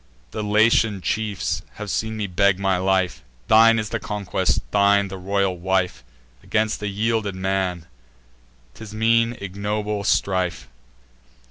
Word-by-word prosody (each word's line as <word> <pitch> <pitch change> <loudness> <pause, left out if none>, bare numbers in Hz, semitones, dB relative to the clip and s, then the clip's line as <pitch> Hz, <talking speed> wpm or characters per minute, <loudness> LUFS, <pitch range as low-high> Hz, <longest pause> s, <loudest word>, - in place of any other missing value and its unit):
The 110 - -4
Latian 105 0 +3
chiefs 105 0 -2
have 105 -1 -6
seen 110 0 -2
me 105 - -2
beg 95 +1 +2
my 95 -1 +1
life; 95 0 0 0.3
Thine 115 +1 +6
is 110 -2 -2
the 115 - -2
conquest, 105 -2 -1
thine 100 -1 +3
the 95 - -7
royal 100 0 0
wife: 90 -5 -1 0.4
Against 110 -1 -1
a 105 - -2
yielded 105 0 -1
man, 95 -2 -2 0.9
'tis 105 +9 -10
mean 115 +1 +2
ignoble 105 +1 -3
strife." 90 -11 0
100 Hz, 130 wpm, -22 LUFS, 95-110 Hz, 0.9 s, Thine